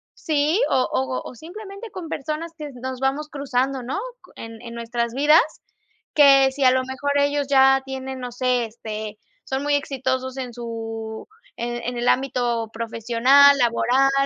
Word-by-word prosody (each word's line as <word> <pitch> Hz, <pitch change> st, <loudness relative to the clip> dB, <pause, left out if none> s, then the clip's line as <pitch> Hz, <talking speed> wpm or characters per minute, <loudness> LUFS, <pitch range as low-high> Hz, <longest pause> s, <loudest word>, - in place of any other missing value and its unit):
¿sí? 310 Hz, +5 st, +1 dB
o 260 Hz, -1 st, +2 dB
o 130 Hz, -1 st, -1 dB
o -, -, -12 dB
simplemente 395 Hz, -, -10 dB
con 360 Hz, -4 st, -7 dB
personas 315 Hz, +4 st, -4 dB
que 300 Hz, -2 st, -7 dB
nos 260 Hz, -1 st, -5 dB
vamos 280 Hz, +3 st, -1 dB
cruzando, 270 Hz, -2 st, -1 dB
¿no?, 265 Hz, +11 st, -3 dB, 0.4 s
en 225 Hz, 0 st, -9 dB
en 235 Hz, -1 st, -8 dB
nuestras 235 Hz, 0 st, -3 dB
vidas, 295 Hz, +4 st, +5 dB, 0.7 s
que 275 Hz, -2 st, +6 dB
si 275 Hz, 0 st, -3 dB
a -, -, +8 dB
lo 260 Hz, 0 st, +1 dB
mejor 265 Hz, +2 st, -3 dB
ellos 285 Hz, 0 st, +1 dB
ya 270 Hz, -1 st, +5 dB
tienen, 265 Hz, 0 st, -6 dB
no 250 Hz, -1 st, -6 dB
sé, 250 Hz, -1 st, 0 dB
este, 215 Hz, -1 st, -7 dB, 0.3 s
son 265 Hz, +1 st, -2 dB
muy 290 Hz, 0 st, +2 dB
exitosos 260 Hz, -2 st, -2 dB
en 250 Hz, -2 st, -5 dB
su 225 Hz, -2 st, -6 dB, 0.3 s
en 240 Hz, 0 st, -3 dB
en 245 Hz, +1 st, -3 dB
el 240 Hz, +1 st, -1 dB
ámbito 245 Hz, -4 st, 0 dB
profesional, 235 Hz, +5 st, +4 dB
laboral, 250 Hz, +2 st, +3 dB
260 Hz, 160 wpm, -22 LUFS, 235-285 Hz, 0.7 s, a